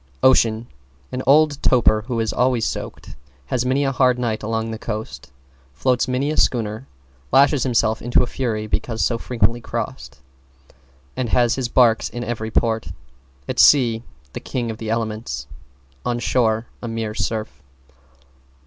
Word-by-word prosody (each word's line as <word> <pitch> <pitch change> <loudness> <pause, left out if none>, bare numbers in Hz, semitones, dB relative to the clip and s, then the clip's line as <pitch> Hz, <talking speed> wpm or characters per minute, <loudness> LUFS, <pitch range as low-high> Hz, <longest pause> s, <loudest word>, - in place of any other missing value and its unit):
=OCEAN= 115 -3 +4 0.5
An 125 - -3
old 145 0 +4
toper 110 -4 +3
who 120 -3 -2
is 110 -1 -1
always 125 -2 +1
soaked, - - -6 0.3
has 125 - -1
many 135 +2 +2
a 135 - +1
hard 130 -2 +3
night 115 -3 -2
along 110 +1 -2
the 110 - -6
coast, 105 - -6 0.4
floats 125 - +1
many 130 +3 0
a 155 - -3
schooner, 110 0 0 0.4
lashes 140 0 +5
himself 115 -3 +1
into 120 +1 +2
a - - 0
fury 115 -4 -3
because 110 +1 -1
so 115 -1 -1
frequently 115 0 0
crossed, 70 - -5 1.0
and 125 -3 -2
has 120 0 +3
his 125 -1 -2
barks 115 -2 +3
in 120 - -5
every 110 -2 -4
port. 110 0 0 0.6
At - - -3
sea, 120 -6 +5 0.3
the - - -5
king 120 -3 -3
of 110 - -9
the 110 - -5
elements; 110 - -3 0.6
on 120 -1 -1
shore, 115 -2 +1 0.2
a 120 - -5
mere 115 -1 -3
surf. 110 -5 -3
115 Hz, 155 wpm, -21 LUFS, 110-125 Hz, 1.0 s, lashes